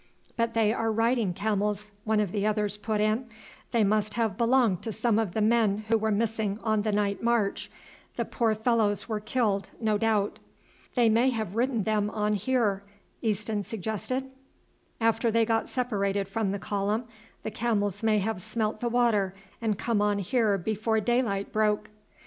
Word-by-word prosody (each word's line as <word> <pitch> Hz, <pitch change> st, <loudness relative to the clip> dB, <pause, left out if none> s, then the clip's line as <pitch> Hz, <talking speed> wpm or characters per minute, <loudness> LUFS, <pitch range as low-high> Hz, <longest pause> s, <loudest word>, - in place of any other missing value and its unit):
"But 230 Hz, -1 st, 0 dB
they 220 Hz, -1 st, +3 dB
are 225 Hz, -1 st, 0 dB
riding 225 Hz, -2 st, +2 dB
camels," 210 Hz, +1 st, -1 dB
one 220 Hz, -1 st, +2 dB
of 205 Hz, -4 st, 0 dB
the 205 Hz, -1 st, -1 dB
others 210 Hz, -1 st, +1 dB
put 210 Hz, 0 st, -2 dB
in; 215 Hz, +4 st, +1 dB, 0.4 s
"they 230 Hz, -3 st, +3 dB
must 210 Hz, +1 st, +1 dB
have 225 Hz, -4 st, 0 dB
belonged 235 Hz, -5 st, +3 dB
to 225 Hz, -, -4 dB
some 225 Hz, 0 st, +1 dB
of 210 Hz, -6 st, -1 dB
the 220 Hz, -, +1 dB
men 215 Hz, -2 st, +2 dB
who 225 Hz, -, +4 dB
were 220 Hz, 0 st, 0 dB
missing 215 Hz, -1 st, 0 dB
on 215 Hz, -2 st, +2 dB
the 215 Hz, +1 st, 0 dB
night 205 Hz, -1 st, 0 dB
march; 230 Hz, -4 st, 0 dB, 0.5 s
the -, -, -1 dB
poor 225 Hz, -2 st, +1 dB
fellows 220 Hz, -3 st, +1 dB
were 215 Hz, -2 st, -2 dB
killed, 210 Hz, -3 st, 0 dB
no 215 Hz, -2 st, +1 dB
doubt." 215 Hz, -2 st, +1 dB, 0.6 s
"They 240 Hz, -2 st, +4 dB
may 230 Hz, +4 st, +4 dB
have 220 Hz, -6 st, -3 dB
ridden 235 Hz, -2 st, +1 dB
them 210 Hz, -1 st, +1 dB
on 210 Hz, 0 st, 0 dB
here," 210 Hz, -2 st, +1 dB, 0.4 s
Easton 215 Hz, -1 st, -1 dB
suggested; 225 Hz, +6 st, -3 dB, 0.7 s
"after 230 Hz, 0 st, +2 dB
they 225 Hz, 0 st, +3 dB
got 225 Hz, 0 st, 0 dB
separated 200 Hz, -6 st, -1 dB
from 205 Hz, +1 st, -1 dB
the 200 Hz, -, -2 dB
column 205 Hz, +3 st, -1 dB, 0.4 s
the 220 Hz, -, -3 dB
camels 205 Hz, -3 st, -1 dB
may 220 Hz, -1 st, +3 dB
have 205 Hz, -1 st, -1 dB
smelt 215 Hz, +1 st, -2 dB
the 240 Hz, -, -1 dB
water 220 Hz, -6 st, +2 dB, 0.3 s
and 215 Hz, -3 st, 0 dB
come 225 Hz, -1 st, 0 dB
on 205 Hz, -1 st, +2 dB
here 205 Hz, +1 st, +1 dB
before 220 Hz, +3 st, 0 dB
daylight 220 Hz, -3 st, 0 dB
broke." 215 Hz, -1 st, +1 dB
215 Hz, 170 wpm, -28 LUFS, 205-230 Hz, 0.7 s, who